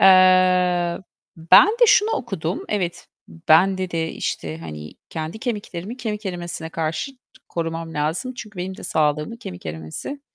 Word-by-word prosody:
Eee, 185 Hz, -2 st, +5 dB, 0.4 s
ben 165 Hz, -, +7 dB
de 475 Hz, +3 st, +4 dB
şunu 420 Hz, 0 st, +5 dB
okudum. 195 Hz, -, -3 dB
Evet, 185 Hz, -5 st, -2 dB, 0.2 s
ben, 160 Hz, -, +3 dB
dedi, 185 Hz, -2 st, -3 dB
işte, 85 Hz, -, -3 dB
hani, 75 Hz, -2 st, -8 dB, 0.2 s
kendi 160 Hz, +5 st, -5 dB
kemiklerimi 210 Hz, -3 st, -4 dB
kemik 215 Hz, -4 st, -4 dB
erimesine 175 Hz, -3 st, -5 dB
karşı 165 Hz, -, -2 dB, 0.4 s
korumam 165 Hz, -1 st, -4 dB
lazım. 160 Hz, -, -1 dB
Çünkü 215 Hz, -4 st, -9 dB
benim 185 Hz, +1 st, -4 dB
de -, -, -11 dB
sağlığımı 150 Hz, +6 st, 0 dB
kemik 90 Hz, -, -8 dB
erimesi, 80 Hz, -, -6 dB
175 Hz, 135 wpm, -22 LUFS, 160-205 Hz, 0.4 s, ben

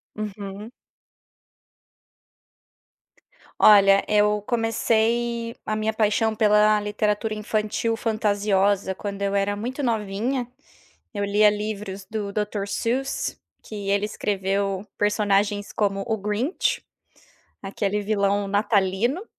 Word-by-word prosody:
Uhum. 210 Hz, +1 st, -6 dB, 2.9 s
Olha, 195 Hz, -2 st, +7 dB
eu 210 Hz, 0 st, +3 dB
comecei 230 Hz, 0 st, 0 dB
a 215 Hz, -, -1 dB
minha 215 Hz, 0 st, -1 dB
paixão 220 Hz, +1 st, +1 dB
pela 210 Hz, 0 st, +4 dB
literatura 210 Hz, +1 st, -1 dB
infantil 215 Hz, +1 st, -1 dB
fantasiosa 205 Hz, -3 st, +1 dB
quando 200 Hz, +1 st, -6 dB
eu 200 Hz, 0 st, 0 dB
era 200 Hz, 0 st, +1 dB
muito 245 Hz, +7 st, -4 dB
novinha. 230 Hz, +2 st, -1 dB, 0.7 s
Eu 205 Hz, -1 st, -2 dB
lia 210 Hz, +1 st, +4 dB
livros 205 Hz, -2 st, -4 dB
do 210 Hz, -2 st, -4 dB
Dr. 210 Hz, -1 st, -2 dB
Seuss, 255 Hz, +6 st, -2 dB, 0.2 s
que 205 Hz, -2 st, -6 dB
ele 200 Hz, +1 st, +2 dB
escreveu 195 Hz, -1 st, -2 dB
personagens 205 Hz, 0 st, +1 dB
como 195 Hz, -2 st, 0 dB
o 220 Hz, -1 st, 0 dB
Grinch, 210 Hz, -, -1 dB, 0.8 s
aquele 200 Hz, +1 st, -2 dB
vilão 205 Hz, -1 st, +1 dB
natalino. 205 Hz, -, +1 dB
210 Hz, 100 wpm, -24 LUFS, 200-220 Hz, 2.9 s, Olha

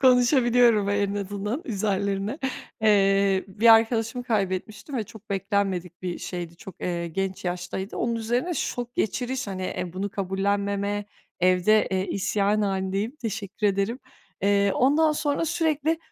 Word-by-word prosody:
konuşabiliyorum 245 Hz, -4 st, +5 dB
en 200 Hz, 0 st, +1 dB
azından 205 Hz, -, -3 dB
üzerilerine. 200 Hz, +2 st, -1 dB, 0.4 s
Eee, 195 Hz, -2 st, +4 dB
bir 225 Hz, +4 st, +6 dB
arkadaşımı 225 Hz, +2 st, +1 dB
kaybetmiştim 210 Hz, +3 st, -2 dB
ve 220 Hz, -, -1 dB
çok 220 Hz, -1 st, -15 dB
beklenmedik 190 Hz, -3 st, -1 dB
bir 180 Hz, -1 st, -3 dB
şeydi, 170 Hz, -2 st, -6 dB
çok, 190 Hz, -, -12 dB
eee, 170 Hz, -1 st, -2 dB
genç 190 Hz, +2 st, -3 dB
yaştaydı. 180 Hz, +2 st, -4 dB
Onun 235 Hz, 0 st, 0 dB
üzerine 240 Hz, +9 st, -1 dB
şok 245 Hz, -3 st, -3 dB
geçiriş, 255 Hz, +3 st, -1 dB
hani, 190 Hz, -2 st, -4 dB
eee, 180 Hz, -2 st, -3 dB
bunu 195 Hz, +2 st, -3 dB
kabullenmeme, 200 Hz, +1 st, -1 dB, 0.4 s
evde, 185 Hz, +4 st, +4 dB
eee, 190 Hz, 0 st, 0 dB
isyan 200 Hz, +2 st, +1 dB
halindeyim, 195 Hz, +6 st, -1 dB
teşekkür 215 Hz, -3 st, -3 dB
ederim. 200 Hz, +5 st, 0 dB, 0.4 s
Eee, 200 Hz, 0 st, +3 dB
ondan 300 Hz, +5 st, +4 dB
sonra 295 Hz, +1 st, 0 dB
sürekli 320 Hz, -1 st, 0 dB
205 Hz, 130 wpm, -25 LUFS, 195-235 Hz, 0.4 s, bir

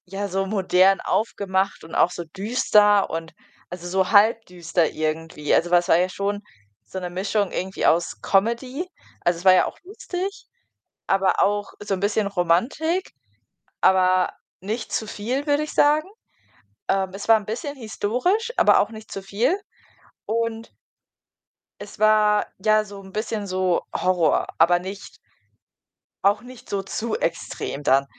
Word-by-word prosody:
Ja, 195 Hz, +2 st, -4 dB
so 195 Hz, 0 st, -1 dB
modern 190 Hz, -1 st, +3 dB
aufgemacht 195 Hz, -3 st, -1 dB
und 160 Hz, -, -12 dB
auch 180 Hz, -, +4 dB
so 175 Hz, -, -5 dB
düster 205 Hz, +2 st, +2 dB
und 165 Hz, 0 st, -5 dB, 0.4 s
also, 175 Hz, 0 st, -7 dB
so 185 Hz, +1 st, 0 dB
halb 225 Hz, +2 st, +5 dB
düster 170 Hz, -2 st, 0 dB
irgendwie. 155 Hz, -1 st, -2 dB
Also, 175 Hz, +1 st, +1 dB
weil 175 Hz, -, +6 dB
es 175 Hz, -, -6 dB
war -, -, +5 dB
ja 180 Hz, +1 st, +1 dB
schon 200 Hz, +2 st, -3 dB, 0.4 s
so 190 Hz, -, -7 dB
'ne 180 Hz, -1 st, -5 dB
Mischung 195 Hz, +2 st, -1 dB
irgendwie 190 Hz, +1 st, -3 dB
aus 170 Hz, +1 st, +2 dB
Comedy 235 Hz, -, 0 dB, 0.3 s
also, 175 Hz, -1 st, +1 dB
es 175 Hz, -, -12 dB
war 185 Hz, -, +8 dB
ja 185 Hz, -, +4 dB
auch -, -, -7 dB
lustig, 385 Hz, 0 st, -6 dB, 0.6 s
aber 195 Hz, 0 st, +2 dB
auch 205 Hz, 0 st, 0 dB
so 205 Hz, -1 st, -2 dB
'n 185 Hz, -, -5 dB
bisschen 205 Hz, +1 st, +1 dB
Romantik, 200 Hz, -, 0 dB, 0.7 s
aber 185 Hz, -1 st, +4 dB, 0.3 s
nicht 220 Hz, +4 st, -4 dB
zu 220 Hz, -, -1 dB
viel, 250 Hz, +8 st, -3 dB
würde 290 Hz, +1 st, +2 dB
ich 305 Hz, -, -7 dB
sagen. 300 Hz, +3 st, +3 dB, 0.8 s
Ähm, 190 Hz, -1 st, +1 dB
es 200 Hz, +2 st, -7 dB
war 225 Hz, -, +8 dB
'n 210 Hz, -, -12 dB
bisschen 245 Hz, +7 st, -5 dB
historisch, 255 Hz, -, -1 dB
aber -, -, +6 dB
auch -, -, 0 dB
nicht 220 Hz, -1 st, -11 dB
zu 195 Hz, -, -6 dB
viel. 230 Hz, -, 0 dB, 0.7 s
Und 230 Hz, 0 st, -2 dB, 1.1 s
es 205 Hz, -, -10 dB
war, 215 Hz, -1 st, +4 dB, 0.2 s
ja, 215 Hz, 0 st, +3 dB
so 200 Hz, -1 st, -10 dB
'n 190 Hz, 0 st, -13 dB
bisschen 215 Hz, 0 st, -3 dB
so 185 Hz, -2 st, 0 dB
Horror, 180 Hz, -4 st, +1 dB
aber 170 Hz, +2 st, +5 dB
nicht 190 Hz, +3 st, -8 dB, 1.1 s
auch 205 Hz, +1 st, +3 dB
nicht 250 Hz, 0 st, -14 dB
so 195 Hz, -1 st, -2 dB
zu 220 Hz, +3 st, -3 dB
extrem 165 Hz, -3 st, -3 dB
dann. 135 Hz, 0 st, +3 dB
200 Hz, 155 wpm, -23 LUFS, 185-225 Hz, 1.1 s, war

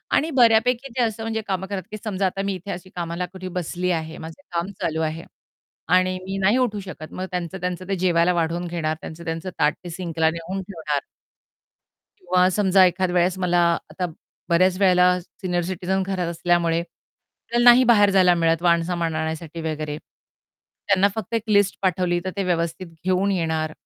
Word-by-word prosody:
आणि 315 Hz, -, +2 dB
बऱ्यापैकी 240 Hz, +3 st, +4 dB
ते -, -, +2 dB
असं 225 Hz, -1 st, -2 dB
म्हणजे 225 Hz, 0 st, -2 dB
कामं 190 Hz, -1 st, -2 dB
करत 195 Hz, -1 st, -4 dB
की 215 Hz, -, -5 dB
समजा 200 Hz, -3 st, -1 dB
आता 190 Hz, +1 st, -1 dB
मी 200 Hz, -, -1 dB
इथे 185 Hz, +2 st, -7 dB
अशी 180 Hz, +1 st, -7 dB
कामाला 170 Hz, +1 st, -3 dB
कुठे 185 Hz, +1 st, -9 dB
बसली 180 Hz, +2 st, -2 dB
आहे, 160 Hz, -1 st, -3 dB
माझं 160 Hz, +3 st, -9 dB
काम 175 Hz, +3 st, -2 dB
चालू 160 Hz, 0 st, -1 dB
आहे 160 Hz, +1 st, -2 dB, 0.7 s
आणि 185 Hz, 0 st, +2 dB
मी 195 Hz, +1 st, -4 dB
नाही 195 Hz, +5 st, +3 dB
उठू 225 Hz, -5 st, 0 dB
शकत. 170 Hz, -5 st, -9 dB
मग 185 Hz, -, -4 dB
त्यांचं 180 Hz, +1 st, -3 dB
त्यांचं 180 Hz, 0 st, -3 dB
ते 195 Hz, -, +1 dB
जेवायला 175 Hz, -1 st, +2 dB
वाढवून 170 Hz, +1 st, -1 dB
घेणार, 165 Hz, -2 st, -2 dB
त्यांचं 170 Hz, +2 st, -9 dB
त्यांचं 165 Hz, +3 st, -4 dB
ताट 150 Hz, +1 st, +3 dB
ते 175 Hz, -, -7 dB
सिंकला 165 Hz, -2 st, 0 dB
नेऊन 170 Hz, +4 st, -4 dB
ठेवणार. 160 Hz, -6 st, -3 dB, 1.2 s
किंवा 180 Hz, 0 st, +2 dB
समजा 190 Hz, -2 st, +5 dB
एखाद 180 Hz, +1 st, 0 dB
वेळेस 180 Hz, +1 st, +1 dB
मला 180 Hz, -1 st, +1 dB, 0.3 s
आता 180 Hz, +4 st, -3 dB, 0.4 s
बऱ्याच 185 Hz, +2 st, +3 dB
वेळेला 180 Hz, -2 st, +5 dB
सीनियर 180 Hz, 0 st, -3 dB
सिटीझन 185 Hz, +1 st, -1 dB
घरात 185 Hz, -3 st, -1 dB
असल्यामुळे 170 Hz, -1 st, +1 dB
आपल्याला 235 Hz, +6 st, -6 dB
नाही 255 Hz, +2 st, +6 dB
बाहेर 205 Hz, -4 st, +5 dB
जायला 185 Hz, -2 st, +5 dB
मिळत 165 Hz, -1 st, +1 dB
वाण-सामान 170 Hz, -1 st, +1 dB
आणण्यासाठी 160 Hz, +1 st, -4 dB
वगैरे. 155 Hz, -2 st, -3 dB, 0.9 s
त्यांना 200 Hz, 0 st, +4 dB
फक्त 220 Hz, +1 st, -5 dB
एक 225 Hz, -, +1 dB
लिस्ट 205 Hz, -2 st, +3 dB
पाठवली, 180 Hz, -2 st, +1 dB
तर 185 Hz, -, -2 dB
ते 195 Hz, -, -1 dB
व्यवस्थित 170 Hz, 0 st, -1 dB, 0.2 s
घेऊन 185 Hz, +2 st, +2 dB
येणार. 160 Hz, -3 st, -1 dB
180 Hz, 175 wpm, -23 LUFS, 170-190 Hz, 1.2 s, नाही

